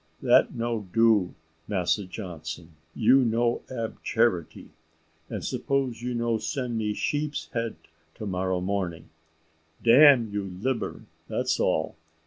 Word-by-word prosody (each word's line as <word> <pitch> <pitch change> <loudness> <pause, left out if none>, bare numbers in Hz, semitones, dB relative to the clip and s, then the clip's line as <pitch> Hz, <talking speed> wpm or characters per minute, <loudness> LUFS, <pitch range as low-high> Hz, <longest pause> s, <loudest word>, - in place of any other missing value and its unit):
That - - +4
no 115 -3 -2
do, 110 -5 +3 0.3
Massa 100 0 0
Johnson; 85 -4 -7 0.2
you 135 - +5
no 120 -1 +1
ab 115 -3 -5
charity; - - 0 0.6
and - - -5
suppose 135 -4 -1
you 125 0 -3
no 115 -1 0
send 125 -2 -3
me 105 -2 -1
sheep's 150 0 -2
head 115 -1 -2 0.4
to 110 - -7
morrow 95 -1 -1
morning, 90 -4 -3 0.7
dam 125 0 +7
you 100 -1 -2
libber, 130 +3 -2 0.2
that's - - -1
all. 80 0 0
115 Hz, 120 wpm, -26 LUFS, 95-120 Hz, 0.7 s, dam